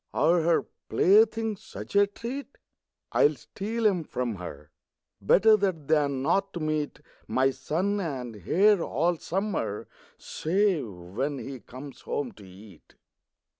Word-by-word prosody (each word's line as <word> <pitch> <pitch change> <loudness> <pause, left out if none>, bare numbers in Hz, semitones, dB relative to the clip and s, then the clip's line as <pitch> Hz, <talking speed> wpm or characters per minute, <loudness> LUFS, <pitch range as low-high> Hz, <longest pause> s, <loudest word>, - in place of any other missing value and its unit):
Are 170 +1 +4
her 165 +1 +2 0.2
playthings 220 +1 +3
such - - -9
a 200 0 +6
treat? 250 +7 -7 0.5
I - - +4
will 150 - -4
steal 220 - -4
'em 185 -5 +3
from 125 -7 -3
her; 75 -4 -9 0.5
Better 215 - +6
that 185 -8 -1
than 145 -4 +2
not 195 +6 +1
to 175 - -4
meet 155 -2 -2 0.3
My 130 +1 +2
son 170 +10 -1
and 130 - -4
heir 205 +3 +5
all 165 +3 0
summer, 190 - -2 0.3
Save 185 - 0
when 95 +11 -4
he 135 0 -7
comes 130 +4 -11
home 135 -4 -3
to 100 -2 -15
eat. 95 -1 -16
160 Hz, 135 wpm, -27 LUFS, 130-200 Hz, 0.5 s, a